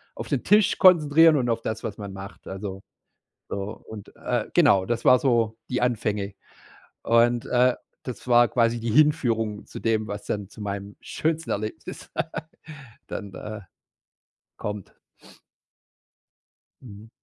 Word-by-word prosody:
auf - - -6
den - - -1
Tisch 210 -1 +4
konzentrieren 160 -3 +6
und 120 -2 0
auf 115 0 0
das, 110 0 -4
was 100 - -5
man 100 -2 -7
macht, 95 +1 -10
also, 95 0 -6 0.7
so. 100 +2 -4
Und, 105 -2 -10
äh, - - -2
genau, 95 -2 +5
das 120 +2 -2
war 125 - +7
so 115 -4 +1
die 125 - -1
Anfänge. 105 -4 -1 0.7
Und, 120 +1 +3
äh, 125 0 +3 0.3
das 125 0 -8
war 120 0 +6
quasi 115 -1 +1
die 115 0 -2
Hinführung 115 -6 +2
zu - - -9
dem, 110 -1 0
was 105 - -5
dann 100 -2 -3
zu 110 - -14
meinem 100 0 -5
schönsten 160 0 -2
Erlebnis 110 +1 -5
d - - +1 0.8
dann, 100 -3 -7
äh, 110 0 -7 1.0
kommt. 105 -2 -6 1.9
Mhm. 110 -2 -12
115 Hz, 140 wpm, -25 LUFS, 105-125 Hz, 1.9 s, war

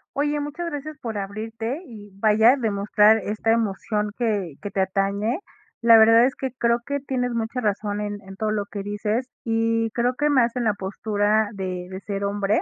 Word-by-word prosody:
Oye, 295 +1 0
muchas 300 +4 -4
gracias 300 0 -6
por 225 -3 -5
abrirte, 225 - -4
y 205 -3 -12
vaya, 220 +4 +5
demostrar 210 -2 +3
esta 215 +2 -2
emoción 210 -1 0
que 205 - -1
que 205 - -4
te 200 - -3
atañe. 200 - 0 0.4
La 230 -1 +8
verdad, 225 +2 +7
es 265 - -4
que 265 -1 -4
creo 235 0 +2
que 285 +2 -2
tienes 255 -2 -2
mucha 230 +2 -2
razón 205 -1 -1
en 205 -1 -4
en 195 0 -11
todo 215 +2 -1
lo 205 -1 -1
que 200 -1 -6
dices, 210 +4 -2 0.2
y 225 0 +1
creo 245 +2 +1
que 295 +3 0
más 250 -4 +3
en 245 -2 -1
la 215 - +2
postura 205 +2 0
de 185 -2 -4
de 190 0 -6
ser 200 -1 -3
hombre, 200 +1 +1
220 Hz, 190 wpm, -23 LUFS, 205-240 Hz, 0.4 s, La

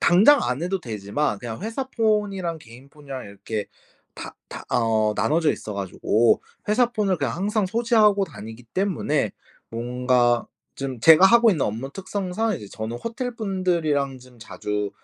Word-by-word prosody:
당장 220 +11 +6
안 130 +6 -2
해도 185 +2 -1
되지만 105 +1 -2
그냥 115 -2 -6
회사폰이랑 210 -7 -1
개인폰이랑 135 +1 -10
이렇게 100 +1 -5 0.5
다 - - -8
다 - - -8
어 110 -2 +2
나눠져 160 0 +2
있어 105 - -7
가지고 100 +3 +1 0.3
회사폰을 215 -4 +2
그냥 - - -1
항상 205 +2 0
소지하고 215 -1 +3
다니기 115 - -10
때문에 155 - -1 0.4
뭔가 120 0 +1 0.3
좀 135 -3 -5
제가 165 +7 +8
하고 235 +1 +6
있는 160 -9 +1
업무 115 +6 -4
특성상 195 +2 -2
이제 105 - -10
저는 110 +3 -5
호텔분들이랑 185 - -1
좀 125 -1 -18
자주 105 -2 -4
150 Hz, 315 characters per minute, -23 LUFS, -, 0.5 s, 제가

